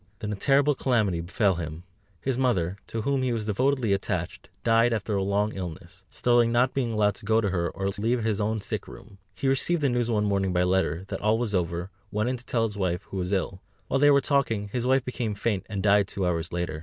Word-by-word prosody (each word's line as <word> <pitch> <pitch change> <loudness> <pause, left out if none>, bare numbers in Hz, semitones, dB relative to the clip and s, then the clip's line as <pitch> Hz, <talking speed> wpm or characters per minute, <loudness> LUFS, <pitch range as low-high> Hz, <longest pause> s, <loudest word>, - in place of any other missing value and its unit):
Then 105 0 -4
a - - -2
terrible 140 +7 +3
calamity 110 -10 +1
befell 95 +2 +1
him. 80 0 -6 0.4
His 135 -1 -1
mother, 100 -8 0
to 115 -1 -4
whom 140 +1 +1
he 130 -1 0
was 115 -2 -2
devotedly 125 +1 +1
attached, 100 - -3
died 115 +1 +4
after 105 -1 -2
a 100 - +1
long 100 +2 0
illness, 95 0 -8
Sterling 120 -1 +2
not 125 +2 +2
being 125 -4 -1
allowed 105 -1 +2
to - - -10
go 110 0 +4
to 105 -4 0
her, 85 -2 0
or 95 - -5
to 100 - -6
leave 115 +1 +1
his 110 -2 0
own 110 +1 -1
sick - - -4
room. 100 - -13 0.2
He 135 - -2
received 145 +5 +2
the 140 - +3
news 120 -1 0
one 105 -2 +1
morning 100 -2 0
by 90 0 +2
letter, 90 -2 0
that - - -4
all 110 +2 +3
was 115 -3 -2
over, 85 0 -1 0.2
went 105 +3 0
in 130 - -2
to 120 - -15
tell 115 -2 +1
his 105 -2 -2
wife, 90 0 -1
who 95 - -4
was 90 0 -2
ill; 95 -1 -1 0.3
while 135 - +1
they 145 +1 +6
were 140 -1 +5
talking, 115 -8 0
his 120 +3 -2
wife 130 0 +3
became 120 -4 -3
faint, 100 -1 -2
and 100 -2 -3
died 100 -1 +4
two 95 -1 -2
hours 85 -1 -1
later. 85 -3 -3
105 Hz, 240 wpm, -26 LUFS, 95-120 Hz, 0.4 s, they